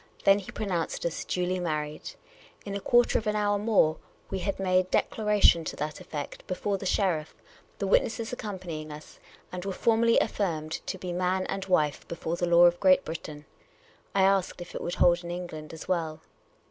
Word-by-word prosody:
Then 195 +1 +6
he 195 - -10
pronounced 180 -7 -2
us 170 - -2
duly 180 0 -1
married. 155 -3 -3 0.5
In 200 - -5
a 200 - -2
quarter 240 +4 +3
of 220 - -7
an 210 - +1
hour 205 -1 +1
more, 200 -7 +3 0.3
we 195 - -2
had 195 +1 -2
made 185 -1 +2
declaration 210 -7 +3
to - - -4
that 150 +1 -4
effect 145 -2 -7
before 195 +2 -2
the 190 - -3
sheriff, 170 -6 0 0.4
the 200 - -2
witnesses 225 +4 +1
accompanying 180 -9 -6
us, 150 +1 -11 0.3
and 180 -1 -5
were 195 - -3
formally 230 +3 +3
affirmed 165 -8 -1 0.2
to - - -3
be 180 -1 -5
man 185 +1 0
and 195 -1 -3
wife 155 -6 +1
before 170 0 -3
the 175 0 -1
law 170 0 +7
of 175 0 +4
Great 185 -1 +5
Britain. 155 -2 -7 0.7
I 195 - +4
asked 195 -2 +2
if 175 - -9
it - - -5
would 175 - -3
hold 175 0 +4
in 170 - -7
England 175 -3 -6
as 160 - -9
well. 165 -4 -1
180 Hz, 185 wpm, -28 LUFS, 165-195 Hz, 0.7 s, law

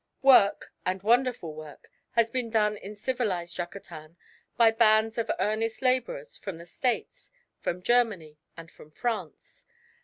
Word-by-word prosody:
Work, 250 -7 +5
and 185 +1 -2
wonderful 240 -7 +1
work, 155 -2 -11 0.3
has 230 -1 +2
been 250 -2 -2
done 210 -2 +2
in 205 +1 -9
civilised 205 -7 -2
Yucatan 170 -2 -8 0.4
by 230 -1 +6
bands 225 0 +3
of 230 - -2
earnest 225 +3 -1
labourers - - 0
from 195 -5 -6
the 170 - -11
States, 245 +8 -3 0.3
from 180 +1 -3
Germany, 200 -11 +1 0.2
and 165 0 -11
from 150 - -16
France. 240 - -5
215 Hz, 135 wpm, -27 LUFS, 175-240 Hz, 0.4 s, by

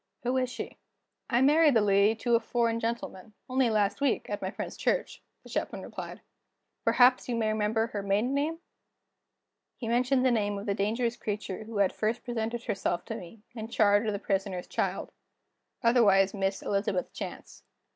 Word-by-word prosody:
Who 250 +1 0
is 255 -1 +1
she?" - - -7 0.5
"I 240 -1 +3
married 300 0 +5
the 225 - +5
lady 200 +1 +4
to 240 - +1
a 230 - +6
foreign 230 0 0
gentleman, 225 -3 -4
only 255 -1 +2
last 210 +2 +1
week, 275 -6 0
at 205 - -3
my 190 - -2
friend's - - -6
church," - - -1 0.2
the - - -14
Chaplain - - -3
replied. - - -8 0.6
"Perhaps 250 0 +4
you 240 - 0
may 225 -2 +1
remember 215 +1 +1
her 215 -3 -4
maiden 205 +6 +1
name?" 300 +4 0 1.2
He 235 - -5
mentioned 255 +3 +2
the 255 - +4
name 205 -3 0
of 200 - -6
the 200 - 0
dangerous 230 +4 -1
creature 210 0 -4
who 225 -1 -6
had 200 -2 +3
first 220 +2 -1
presented 235 0 -3
herself 195 -6 -2
to - - -5
me, 195 +5 -10
in 220 -2 -6
charge 205 -1 +3
of 210 - 0
the - - -1
Prisoner's 195 -3 -2
child - - -2 0.7
otherwise 205 -5 +5
Miss 195 -1 -1
Elizabeth 200 -2 -1
Chance. - - -8
220 Hz, 175 wpm, -29 LUFS, 200-240 Hz, 1.2 s, a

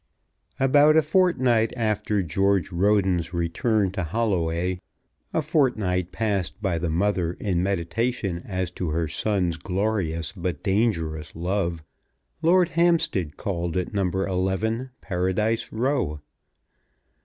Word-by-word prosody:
About 145 +3 +5
a 160 - +5
fortnight 130 -9 +2
after 105 -3 0
George 95 +2 +1
Roden's 90 -2 +1
return 95 +4 +1
to 95 -1 -3
Holloway, 90 -3 -1 0.5
a 160 - 0
fortnight 110 - +1
passed 100 -4 -1
by 95 -5 -1
the 85 0 -1
mother 90 0 0
in 90 -3 -1
meditation 95 +1 -1
as 95 -2 -3
to 90 -2 -3
her 80 +1 0
son's 90 0 0
glorious 90 -2 -1
but 85 -6 -4
dangerous 85 -8 0
love, 85 -1 -1 0.6
Lord 180 +2 +4
Hampstead 165 - +1
called 85 -3 -2
at 90 - -2
No. 100 -3 +1
11, 95 +6 -1
Paradise 95 +4 -1
Row. 115 - 0
95 Hz, 115 wpm, -25 LUFS, 85-110 Hz, 0.6 s, About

